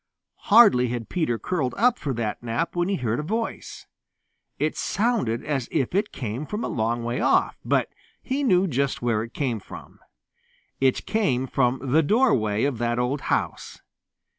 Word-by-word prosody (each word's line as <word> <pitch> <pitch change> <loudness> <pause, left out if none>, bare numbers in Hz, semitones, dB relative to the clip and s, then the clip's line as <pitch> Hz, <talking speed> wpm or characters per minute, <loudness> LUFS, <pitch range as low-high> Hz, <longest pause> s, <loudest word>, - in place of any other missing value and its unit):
Hardly 205 - +6
had 120 -2 -4
Peter 155 -10 0
curled 140 -4 -2
up 245 +2 +3
for 140 - -3
that 110 -3 -3
nap 120 +9 -2
when 175 +1 0
he 200 - +1
heard 120 -7 -1
a - - 0
voice. 225 +9 -4 0.7
It - - -1
sounded 200 - -1
as 135 -5 -2
if 135 - -1
it 205 +3 0
came 125 +4 -5
from 210 +2 -4
a - - -1
long 115 +1 -1
way 120 +1 -2
off, - - +2
but - - +1 0.3
he 275 +2 -2
knew 185 -7 +4
just 140 -6 -1
where 115 -3 +1
it 115 +2 -8
came 125 -6 -1
from. - - -12 0.8
It 130 -1 +1
came 140 - 0
from 130 0 0
the 155 +4 +5
doorway 145 - +2
of 135 -5 -1
that 120 0 0
old 125 +3 -1
house. - - -2
135 Hz, 170 wpm, -24 LUFS, 120-185 Hz, 0.8 s, Hardly